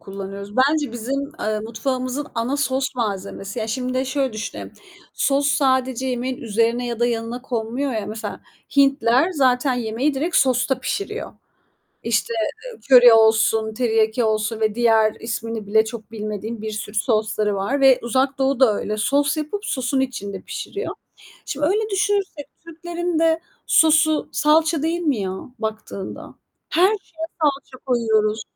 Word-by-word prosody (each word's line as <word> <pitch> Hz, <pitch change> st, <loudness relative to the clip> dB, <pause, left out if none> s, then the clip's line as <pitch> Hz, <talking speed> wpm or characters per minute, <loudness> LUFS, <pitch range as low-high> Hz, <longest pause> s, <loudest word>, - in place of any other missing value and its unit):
kullanıyoruz. 200 Hz, +1 st, -8 dB
Bence 285 Hz, 0 st, +2 dB
bizim, 275 Hz, +4 st, -3 dB
eee, 215 Hz, 0 st, -1 dB
mutfağımızın 255 Hz, +5 st, -3 dB
ana 235 Hz, +5 st, -1 dB
sos 265 Hz, -1 st, -1 dB
malzemesi. 200 Hz, -1 st, -4 dB
Ya, 220 Hz, -, -2 dB
şimdi 255 Hz, +2 st, -3 dB
de 260 Hz, +1 st, +1 dB
şöyle 265 Hz, -2 st, -1 dB
düşünelim. 215 Hz, 0 st, -6 dB, 0.4 s
Sos 280 Hz, 0 st, +1 dB
sadece 260 Hz, -2 st, +1 dB
yemeğin 255 Hz, +1 st, -2 dB
üzerine 230 Hz, +2 st, 0 dB
ya 235 Hz, -1 st, -4 dB
da 240 Hz, -, +4 dB
yanına 235 Hz, +1 st, -3 dB
konmuyor 245 Hz, +2 st, -2 dB
ya. 215 Hz, -2 st, -3 dB
Mesela 220 Hz, +1 st, -6 dB, 0.4 s
Hintliler 275 Hz, +3 st, +4 dB
zaten 260 Hz, -2 st, +2 dB
yemeği 245 Hz, +5 st, -1 dB
direkt 320 Hz, +7 st, -1 dB
sosta 260 Hz, 0 st, +2 dB
pişiriyor. 415 Hz, -, -4 dB, 0.7 s
İşte, 230 Hz, 0 st, 0 dB, 0.3 s
eee, -, -, -9 dB
köri 245 Hz, -3 st, +9 dB
olsun, 220 Hz, 0 st, +4 dB
teriyaki 225 Hz, 0 st, +1 dB
olsun 215 Hz, 0 st, 0 dB
ve 215 Hz, -1 st, 0 dB
diğer 225 Hz, -2 st, +3 dB
ismini 225 Hz, -2 st, -4 dB
bile 220 Hz, +1 st, +4 dB
çok 220 Hz, -1 st, -8 dB
bilmediğim 215 Hz, +1 st, -5 dB
bir 220 Hz, 0 st, -4 dB
sürü 210 Hz, 0 st, -6 dB
sosları 215 Hz, -2 st, +1 dB
var 260 Hz, +9 st, -1 dB
ve 265 Hz, -2 st, +6 dB
Uzak 265 Hz, +4 st, 0 dB
Doğu 270 Hz, -1 st, +1 dB
da 240 Hz, -6 st, +5 dB
öyle. 210 Hz, +1 st, -3 dB
Sos 280 Hz, +8 st, +1 dB
yapıp 405 Hz, +8 st, -4 dB
sosun 260 Hz, 0 st, -1 dB
içinde 200 Hz, -7 st, -3 dB
pişiriyor. 415 Hz, +3 st, -5 dB, 0.5 s
Şimdi 290 Hz, +1 st, -2 dB
öyle 425 Hz, +5 st, +1 dB
düşünürsek, 390 Hz, -7 st, -1 dB, 0.2 s
Türklerin 345 Hz, 0 st, -3 dB
de 325 Hz, 0 st, +3 dB, 0.3 s
sosu 315 Hz, -1 st, +4 dB
salça 315 Hz, +1 st, +3 dB
değil 335 Hz, +2 st, 0 dB
mi 290 Hz, -7 st, +1 dB
ya 190 Hz, -1 st, -2 dB, 0.3 s
baktığında? 220 Hz, -3 st, -6 dB, 0.3 s
Her 350 Hz, +4 st, +4 dB
şeye 335 Hz, -6 st, -4 dB
salça 275 Hz, -3 st, -1 dB
koyuyoruz. 220 Hz, -3 st, +1 dB
250 Hz, 145 wpm, -21 LUFS, 220-280 Hz, 0.7 s, köri